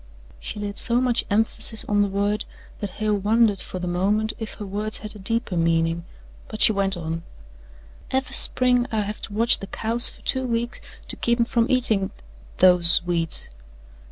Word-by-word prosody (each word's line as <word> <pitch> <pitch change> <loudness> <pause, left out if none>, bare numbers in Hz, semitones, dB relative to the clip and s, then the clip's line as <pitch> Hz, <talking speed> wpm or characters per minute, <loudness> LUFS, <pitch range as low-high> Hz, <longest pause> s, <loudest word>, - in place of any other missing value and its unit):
She 215 - -7
laid 205 -1 -6
so 240 0 0
much 250 -2 0
emphasis 220 +1 +4
on 205 -1 +1
the 205 - +1
word 205 +2 -2 0.4
that 205 - -5
Hale 210 +2 -2
wondered 215 0 +2
for 185 - -8
the 180 - -5
moment 205 +5 -1
if 220 -2 -7
her 210 - -8
words 210 +2 -4
had 215 - -8
a - - -11
deeper 230 0 -3
meaning 165 0 0 0.4
but 215 - -9
she - - +6
went 195 -2 -1
on: 165 0 -5 0.9
"Ever' 265 0 -2
spring 250 -1 +5
I 220 -1 -1
have 210 +1 -6
to 205 - -5
watch 230 +3 +3
the 195 - -8
cows 230 +4 +3
fer - - -16
two 260 -1 -1
weeks 235 0 -3 0.3
to - - -5
keep 235 0 -1
'em 235 - +3
from 235 0 0
eatin' 220 -7 +2 0.5
those 180 -2 +5
weeds." 165 - -2
210 Hz, 185 wpm, -22 LUFS, 190-230 Hz, 0.9 s, she